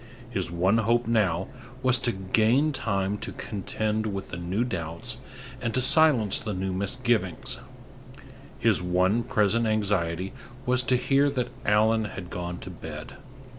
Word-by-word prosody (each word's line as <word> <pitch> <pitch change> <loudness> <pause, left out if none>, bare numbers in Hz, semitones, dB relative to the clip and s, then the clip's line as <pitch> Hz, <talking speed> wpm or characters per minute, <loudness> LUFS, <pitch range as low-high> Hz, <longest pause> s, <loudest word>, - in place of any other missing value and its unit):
His - - -2
one 90 +6 +2
hope 115 +2 +2
now 95 -6 +1 0.4
was 130 -1 +5
to 120 -1 +1
gain 110 +9 +2
time 100 -4 -1
to - - -5
contend 110 +1 -2
with 100 -2 -5
the - - -5
new 90 +6 -1
doubts 85 -8 -4 0.4
and 115 - -2
to 130 - +2
silence 130 - +5
the 105 -3 -4
new 95 0 -2
misgivings; 105 0 0 1.0
his - - +2
one 90 +5 +2
present 110 +1 +1
anxiety 95 -3 0 0.3
was 125 0 +3
to 125 0 +1
hear 140 +3 +3
that 125 -3 -2 0.2
Allan 110 +1 +3
had 95 -4 -7
gone 90 0 -4
to - - -7
bed. - - -9
105 Hz, 145 wpm, -26 LUFS, 95-120 Hz, 1.0 s, was